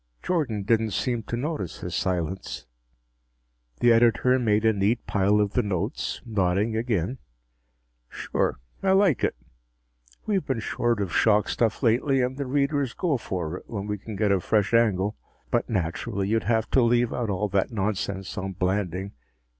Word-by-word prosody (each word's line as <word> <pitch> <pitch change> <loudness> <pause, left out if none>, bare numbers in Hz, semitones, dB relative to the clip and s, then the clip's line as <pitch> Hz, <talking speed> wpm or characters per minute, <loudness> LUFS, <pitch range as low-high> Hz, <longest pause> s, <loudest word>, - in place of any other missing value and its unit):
Jordan 135 - -1
didn't 110 0 +1
seem 120 -2 -1
to 120 +2 -4
notice 130 - -4
his 90 - -5
silence. 90 -7 -2 1.2
The 120 -1 +6
editor 120 +2 +4
made 110 -2 +2
a 110 - +5
neat 105 +4 0
pile 100 +1 +2
of 105 -1 +1
the - - +3
notes, 95 -5 -3
nodding 105 0 0
again. 110 -1 -1 0.9
"Sure. - - -1 0.2
I 190 -1 +3
like 190 - +3
it. - - +1 0.9
We've 200 -5 +1
been 135 -4 -2
short 115 0 0
of 90 - -5
shock 105 -1 +3
stuff 115 +2 0
lately 130 +4 +3
and 125 +1 -1
the 140 -1 -4
readers 140 -1 0
go 165 -7 0
for 90 -6 -4
it - - -15
when 100 -3 -4
we 105 -1 -3
can 110 +2 -8
get 105 0 +1
a 100 - +3
fresh 105 +3 +1
angle. 105 -3 +2 0.3
But - - +1
naturally 95 +1 -2
you'd 110 -3 +1
have 110 +1 +1
to 130 - +4
leave 120 0 +2
out 120 -3 -2
all 100 +1 0
that 95 +3 0
nonsense 100 -2 -2
on 95 0 -4
Blanding. 95 0 -1
110 Hz, 165 wpm, -26 LUFS, 95-120 Hz, 1.2 s, The